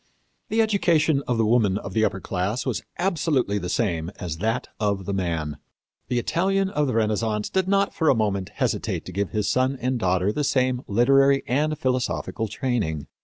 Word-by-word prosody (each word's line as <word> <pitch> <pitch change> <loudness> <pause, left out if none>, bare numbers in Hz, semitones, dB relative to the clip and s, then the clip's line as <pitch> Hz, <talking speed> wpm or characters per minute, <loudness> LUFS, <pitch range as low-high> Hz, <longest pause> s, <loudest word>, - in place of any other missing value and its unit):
"The 225 +1 +3
education 165 -9 +2
of 120 - 0
the 115 - +2
woman 105 -4 +3
of 95 -2 -7
the 110 - +2
upper 95 -3 0
class 95 +6 -2
was - - -1 0.2
absolutely 155 - +1
the 90 - -4
same 85 -7 -1
as 85 -5 -4
that 110 +5 -1
of 100 -3 0
the 100 - -2
man. 80 -6 -2 0.5
The 125 - -1
Italian 190 +9 +1
of 150 -4 +1
the 130 - -1
Renaissance 110 -1 0
did 190 -1 +1
not 200 0 +2
for 160 -3 +2
a - - +5
moment 100 -4 -1
hesitate - - -2
to - - -7
give 100 +1 -1
his 105 -2 -1
son 130 +5 +1
and 125 0 -1
daughter 95 0 +1
the 150 - -2
same 130 -2 +1
literary 135 +5 +4
and 150 +4 0
philosophical 130 -4 -1
training. 105 - -2
115 Hz, 185 wpm, -24 LUFS, 100-140 Hz, 0.5 s, a